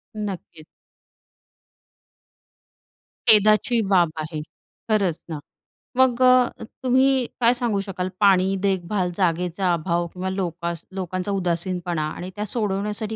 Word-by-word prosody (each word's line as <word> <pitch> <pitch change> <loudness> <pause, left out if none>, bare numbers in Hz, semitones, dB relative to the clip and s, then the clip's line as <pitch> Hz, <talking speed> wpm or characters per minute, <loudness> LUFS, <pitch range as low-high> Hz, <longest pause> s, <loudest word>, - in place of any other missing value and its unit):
नक्कीच. 190 -6 -6 2.6
खेदाची 215 +2 +5
बाब 175 -4 +4
आहे. 155 0 -4 0.5
खरंच 195 -6 +1
ना, 155 -3 -4 0.6
मग 255 -1 +3
अ, 255 -1 +4 0.2
तुम्ही 260 0 +3 0.2
काय 235 +1 +5
सांगू 240 -5 -1
शकाल 185 -2 -4
पाणी, 195 -1 +4
देखभाल, 185 -1 0
जागेचा 180 0 0
अभाव 170 +1 -1
किंवा 185 +1 -4
लोकास 170 -3 -3
लोकांचा 185 +1 -3
उदासीनपणा 175 -3 -1
आणि 180 - -6
त्या 210 +1 -3
सोडवण्यासाठी 210 0 -2
190 Hz, 105 wpm, -23 LUFS, 175-215 Hz, 2.6 s, खेदाची